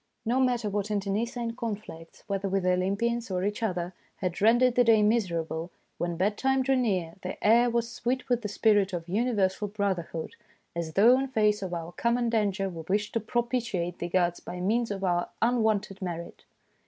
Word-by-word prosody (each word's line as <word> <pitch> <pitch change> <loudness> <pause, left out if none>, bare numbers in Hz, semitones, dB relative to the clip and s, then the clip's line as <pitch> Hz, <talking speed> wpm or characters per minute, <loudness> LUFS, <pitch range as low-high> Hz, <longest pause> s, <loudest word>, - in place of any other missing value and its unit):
No 240 +3 +1
matter 245 -4 +1
what 205 0 -2
inter 200 -1 -1
necine 230 +2 -2
conflicts, 205 -8 -7
whether 195 0 -2
with 195 0 0
the 185 - +3
Olympians 205 +6 0
or 185 -1 -1
each 205 +3 -2
other, 180 -4 -2 0.2
had 180 -1 -3
rendered 240 +3 +5
the 245 - +4
day 225 -2 +5
miser 210 -6 +2
able, 160 +2 -5 0.3
when 175 -1 -2
bed 205 +4 0
time 265 0 +2
drew 270 +1 +2
near 190 -10 0
the - - -5
air 235 +3 +6
was 235 0 0
sweet 250 +2 -2
with 245 -1 +1
the 210 - -3
spirit 205 -2 +2
of 170 -1 -4
universal 205 -1 0
brother 200 -4 -2
hood, 160 -1 -5 0.4
as 165 -2 -3
though 235 +8 +6
in 270 - -1
face 210 -4 +2
of 190 -2 -4
our 170 -1 -4
common 235 +5 0
danger 200 -3 +1
we 170 -3 -6
wished 210 +2 0
to 230 - +1
propitiate 230 -6 -2
the 175 - -3
gods 175 -1 +1
by 180 - -7
means 225 +6 +1
of 195 -1 -4
our 175 -2 +1
unwonted 220 -4 +1
merit. 170 -2 -6
205 Hz, 195 wpm, -28 LUFS, 185-235 Hz, 0.4 s, air